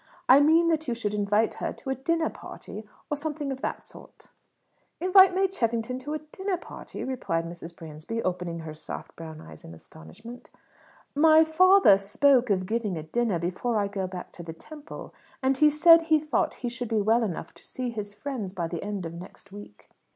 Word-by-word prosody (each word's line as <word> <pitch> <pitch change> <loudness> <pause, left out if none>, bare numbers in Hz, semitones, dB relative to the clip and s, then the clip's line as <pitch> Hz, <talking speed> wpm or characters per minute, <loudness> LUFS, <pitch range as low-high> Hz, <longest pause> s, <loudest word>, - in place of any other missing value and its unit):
I 260 +2 +8
meant 325 +3 +4
that 315 -2 -1
you 240 - -1
should 210 -3 -3
invite 210 +2 +1
her - - -1
to 265 - -6
a - - 0
dinner 320 +5 0
party, 215 +1 -10 0.2
or - - +2
something 295 -1 -4
of 265 0 -6
that - - -4
sort." - - -15 0.7
"Invite 370 +1 +6
May 385 +1 +3
Cheffington 235 -7 -2
to 295 +4 -5
a 310 - -7
dinner 380 -1 -2
party!" - - -9
repeated 165 -11 -2
Mrs. 170 0 -9
Bransby, 165 +9 -6
opening 180 -2 -3
her 160 -1 -7
soft, 155 - -8
brown 160 -1 -9
eyes 80 -1 -13
in 80 - -11
astonishment. 150 - -13 0.6
"My 315 +2 +6
father 325 - +6
spoke 250 +5 +3
of 185 -2 +1
giving 215 -3 -2
a 155 - -5
dinner 220 +3 0
before 180 +7 -2
I 205 -1 +1
go 195 -2 -3
back 180 -1 -8
to - - -11
the 165 -1 -7
Temple, 300 - -11 0.3
and 265 0 +2
he 300 +2 +6
said 330 +3 +7
he 320 -1 +3
thought 305 0 -1
he - - 0
should 240 -1 -5
be 225 -2 +1
well 220 +3 +3
enough 200 -8 -4
to - - -17
see 250 -2 -4
his 210 -3 -5
friends 240 -10 -5
by 170 -4 -3
the 165 -1 -5
end 200 -3 -4
of 165 - -6
next 180 +3 -11
week." 205 - -13
230 Hz, 200 wpm, -26 LUFS, 185-295 Hz, 0.7 s, I